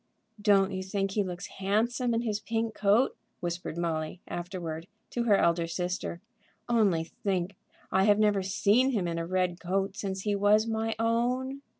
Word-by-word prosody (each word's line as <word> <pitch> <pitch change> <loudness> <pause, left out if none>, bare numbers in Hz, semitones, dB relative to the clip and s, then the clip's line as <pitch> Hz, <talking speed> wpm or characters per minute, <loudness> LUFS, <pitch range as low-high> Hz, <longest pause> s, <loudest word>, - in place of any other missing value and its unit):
"Don't 200 -2 +4
you 185 -1 -3
think 195 +1 -2
he 205 - +1
looks 180 -2 -4
handsome 230 +5 0
in 230 - +1
his 215 -3 -1
pink 225 0 -2
coat?" 210 +5 +3 0.2
whispered 175 -1 -4
Molly, 165 0 -2
afterward, 175 -2 -5 0.2
to 240 -1 -1
her 205 -4 +5
elder 170 -1 +2
sister. 175 0 -3 0.5
"Only 210 -9 +3
think; 185 +2 -3 0.4
I 190 +1 +3
have 205 -1 +5
never 210 -2 +3
seen 205 +7 +3
him 195 -6 0
in 170 0 -2
a 165 - -3
red 180 -1 0
coat 195 +2 -1
since 195 -3 -3
he 205 +1 0
was 205 +2 +4
my 225 0 -1
own. 250 +4 0
195 Hz, 170 wpm, -29 LUFS, 180-220 Hz, 0.5 s, her